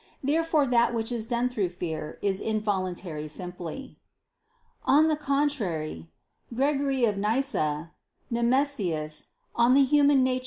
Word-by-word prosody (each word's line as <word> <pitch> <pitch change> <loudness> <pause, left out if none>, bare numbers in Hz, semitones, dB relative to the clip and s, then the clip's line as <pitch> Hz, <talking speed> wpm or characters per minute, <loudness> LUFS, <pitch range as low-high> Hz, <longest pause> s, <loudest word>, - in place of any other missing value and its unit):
Therefore 310 +1 +2
that 240 -1 +2
which 225 +1 -2
is 230 -2 -3
done 240 0 +1
through 215 -7 -1
fear, 160 -3 -5
is 195 -1 0
involuntary 185 -7 -2
simply. 180 - -7 0.8
On 305 +3 +5
the 310 - +2
contrary, 240 - -2 0.4
Gregory 275 0 +1
of 205 -3 0
Nyssa 200 - 0 0.4
[*Nemesius, 235 - 0 0.3
De 235 0 +4
Nat. 270 +1 +5
Hom. 285 -2 +5
xxx. 255 0 +1
235 Hz, 120 wpm, -27 LUFS, 180-275 Hz, 0.8 s, On